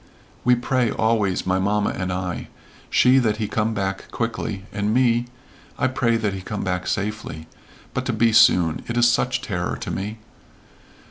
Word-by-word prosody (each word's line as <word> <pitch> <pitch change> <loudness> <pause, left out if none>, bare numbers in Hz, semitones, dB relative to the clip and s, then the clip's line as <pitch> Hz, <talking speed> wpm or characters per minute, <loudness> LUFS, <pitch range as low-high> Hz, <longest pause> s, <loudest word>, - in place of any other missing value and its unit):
"We 125 0 +5
pray, 120 0 0
always, 110 -5 +1
my 95 +1 +1
mamma 105 +2 +1
and 95 -1 -3
I. 90 -1 -3 0.4
She 130 +1 +5
that 110 -4 +1
he 110 -2 -2
come 110 +1 -1
back 95 -1 -3
quickly, 115 -4 -3
and 105 +1 -1
me 120 -1 +3 0.5
I 140 - +1
pray 120 -3 +1
that 105 -3 -1
he 95 - -5
come 105 +3 -4
back 90 -1 -2
safely 100 -6 -3 0.5
but - - -2
to - - 0
be 115 -1 +3
soon 85 -7 +5
it 120 - -3
is 120 0 +5
such 120 - +1
terror - - -2
to - - -5
me." 105 +3 -4
105 Hz, 175 wpm, -22 LUFS, 95-115 Hz, 0.5 s, We